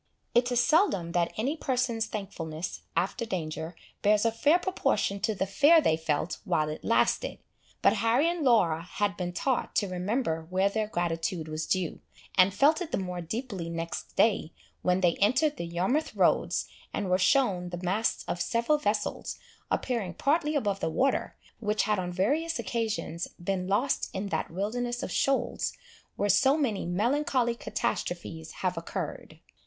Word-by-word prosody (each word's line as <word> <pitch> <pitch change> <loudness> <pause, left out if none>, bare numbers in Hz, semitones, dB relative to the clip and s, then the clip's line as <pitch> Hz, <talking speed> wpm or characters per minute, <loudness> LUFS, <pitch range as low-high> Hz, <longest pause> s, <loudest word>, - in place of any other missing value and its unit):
It 245 +1 +3
is 245 - +3
seldom 245 - +3
that 170 -1 +1
any 265 +8 0
person's 250 -6 0
thankfulness 175 -6 -5 0.2
after 190 +7 0
danger 160 -5 -4 0.3
bears 210 +1 +3
a 230 - +4
fair 290 +9 +4
proportion 355 - 0
to 220 +1 0
the 190 0 0
fear 290 - +6
they 160 - +3
felt 160 +1 -2
while 155 -1 +1
it 155 - -6
lasted; 365 - +1 0.5
but - - +6
Harry 235 +7 +3
and 340 -2 -1
Laura 185 - +4
had 200 +3 -2
been 180 -2 -3
taught 250 +8 -1
to 205 - +2
remember 180 -3 -1
where 190 +2 +2
their 215 +1 -1
gratitude 170 -2 -2
was 155 0 -4
due, 185 -4 -1 0.4
and 185 +1 +6
felt 295 - +3
it 335 -2 -4
the - - +1
more 180 -2 -3
deeply 195 -1 -4
next 165 0 -5
day, 200 -7 +3 0.3
when 180 +1 +2
they 175 -2 +3
entered 265 +8 +2
the 170 - -4
Yarmouth 190 - 0
Roads, - - +2 0.2
and 200 - -2
were 185 0 +2
shewn 190 -4 +2
the 175 - -5
masts 190 +5 0
of 175 - -2
several 245 +6 +1
vessels, 210 -3 -2 0.3
appearing 215 -9 -1
partly 300 - +1
above 205 -8 0
the 160 - -1
water, 265 +11 0 0.2
which 210 -1 +1
had 210 -1 +1
on 180 -1 -3
various 290 - 0
occasions, 220 -7 -2
been 180 +1 -2
lost 225 +8 +1
in 195 +1 -3
that - - -2
wilderness 240 +7 -2
of - - -4
shoals, 260 -3 0 0.4
where 205 - 0
so 270 +9 +4
many 225 - -1
melancholy 240 +5 +1
catastrophes 170 -7 -3
have 180 -1 +1
occurred. 165 - -5
205 Hz, 165 wpm, -28 LUFS, 175-245 Hz, 0.5 s, fear